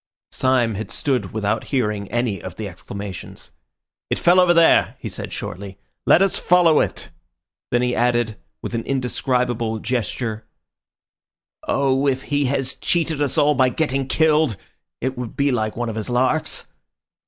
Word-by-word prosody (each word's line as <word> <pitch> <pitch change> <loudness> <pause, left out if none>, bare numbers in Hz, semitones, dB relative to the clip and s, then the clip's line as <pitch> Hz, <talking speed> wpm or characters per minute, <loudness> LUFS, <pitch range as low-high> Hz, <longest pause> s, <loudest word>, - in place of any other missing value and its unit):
Syme 125 -3 +2
had 105 +2 -5
stood 135 -4 -1
without 110 0 -1
hearing 105 -7 -1
any 120 -6 -1
of 90 0 -7
the 110 - -5
exclamations. 100 +1 -8 0.6
"It - - 0
fell 175 +2 +5
over 180 -1 +5
there," 170 -1 +4
he - - -7
said - - -5
shortly. 95 +1 -6 0.3
"Let 185 - +6
us 195 - +1
follow 175 -3 +4
it!" - - -2 0.6
Then 120 0 +1
he 125 0 0
added 120 -3 +1 0.3
with - - -5
an 115 -1 -2
indescribable 125 -3 0
gesture— 115 -1 -3 1.2
"Oh, 135 0 +2
if 135 -1 0
he 145 0 0
has 135 0 0
cheated 165 -3 0
us 145 0 0
all 150 -1 +4
by 130 -1 +3
getting 135 0 -1
killed! 155 -6 +2 0.4
It 130 0 -2
would 120 -3 -6
be 140 0 +2
like 110 -3 -1
one 120 0 -2
of 110 -1 -4
his 110 - -3
larks." 130 +5 0
125 Hz, 155 wpm, -21 LUFS, 110-140 Hz, 1.2 s, Let